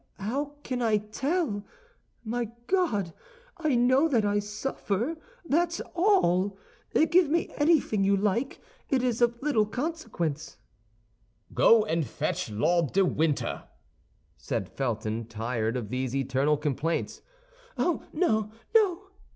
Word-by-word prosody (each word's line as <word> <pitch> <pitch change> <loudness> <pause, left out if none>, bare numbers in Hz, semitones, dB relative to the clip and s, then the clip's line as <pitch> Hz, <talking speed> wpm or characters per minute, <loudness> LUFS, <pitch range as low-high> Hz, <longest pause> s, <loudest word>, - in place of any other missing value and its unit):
"Eh, - - -10
how 280 +7 -2
can 250 -1 -3
I 220 -3 +3
tell? 220 - -2 0.6
My 240 +2 -1 0.2
God! 230 - 0 0.4
I 310 -6 +1
know 255 +5 +4
that 235 -9 +2
I 205 0 +2
suffer, 210 - -2 0.3
that's 340 +3 +1
all. 205 - +2 0.5
Give 345 -3 +5
me 335 +3 0
anything 290 -10 +3
you 200 0 +3
like, 215 +6 -1 0.3
it 260 -2 +2
is 245 -2 0
of 235 0 +2
little 230 -8 +2
consequence." 215 - -3 1.0
"Go 225 -2 +5
and 165 -5 0
fetch 120 - -3
Lord 150 +9 +1
de 195 0 +4
Winter," 155 -3 -1 0.7
said - - -3
Felton, 115 -3 -2
tired 115 +1 -2
of 110 -5 -5
these 130 +1 -2
eternal 135 +2 +1
complaints. 150 +2 -2 0.6
"Oh, 350 - 0
no, 220 - +1 0.2
no!" 395 -3 +3
215 Hz, 125 wpm, -28 LUFS, -, 1.0 s, Give